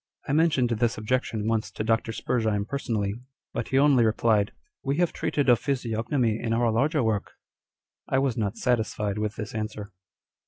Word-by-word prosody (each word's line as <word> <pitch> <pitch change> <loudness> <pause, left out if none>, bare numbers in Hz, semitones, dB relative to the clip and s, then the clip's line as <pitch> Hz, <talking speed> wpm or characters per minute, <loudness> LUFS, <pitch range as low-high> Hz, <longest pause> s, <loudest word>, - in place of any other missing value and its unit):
I 135 - 0
mentioned 150 -6 +3
this 115 0 +1
objection 110 -1 -1
once 115 -1 0
to - - -5
Dr. 115 +1 +1
Spurzheim 110 -3 0
personally, 110 -6 -2 0.4
but - - -3
he 135 - +1
only 140 -3 +5
replied 110 -2 +3
â€" - - -20 0.2
" - - -65
We 140 +1 0
have 175 -1 +2
treated 145 -2 -1
of 120 -2 +6
physiognomy 115 -3 0
in 115 -1 -1
our 115 0 +2
larger 140 +5 +2
work 110 -2 -1 0.4
!" - - -67 0.3
I - - +2
was 135 -3 +1
not 105 -3 -2
satisfied 110 -4 0
with 105 0 -2
this 105 -1 -6
answer. 110 -1 -5
115 Hz, 185 wpm, -26 LUFS, 110-130 Hz, 0.4 s, of